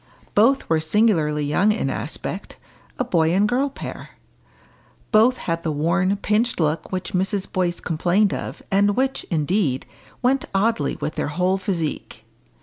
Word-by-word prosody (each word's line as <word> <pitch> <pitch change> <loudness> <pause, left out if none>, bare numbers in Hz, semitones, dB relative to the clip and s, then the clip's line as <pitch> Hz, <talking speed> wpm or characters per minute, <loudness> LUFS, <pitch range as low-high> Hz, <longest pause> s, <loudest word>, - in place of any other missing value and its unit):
Both 260 +6 +3
were 160 -1 +2
singularly 155 -4 +2
young 180 +9 +3
in 215 - -1
aspect - - -5 0.4
a - - +1
boy 170 -7 +2
and 205 +2 +3
girl 260 +5 +1
pair. 275 - -8 1.0
Both 235 +3 +5
had 165 -1 -3
the 160 - -2
worn, 170 +6 +1
pinched 215 +3 0
look 155 0 -1
which 185 +2 -4
Mrs. 190 +1 0
Boyce 175 -2 0
complained 180 +5 +1
of, - - -6
and 200 +1 +3
which, 265 +1 0
indeed, 155 -4 0 0.4
went 260 +2 +2
oddly 225 +4 +1
with 155 - -4
their - - -2
whole 180 +6 0
physique. 175 -5 -4
190 Hz, 145 wpm, -22 LUFS, 165-215 Hz, 1.0 s, Both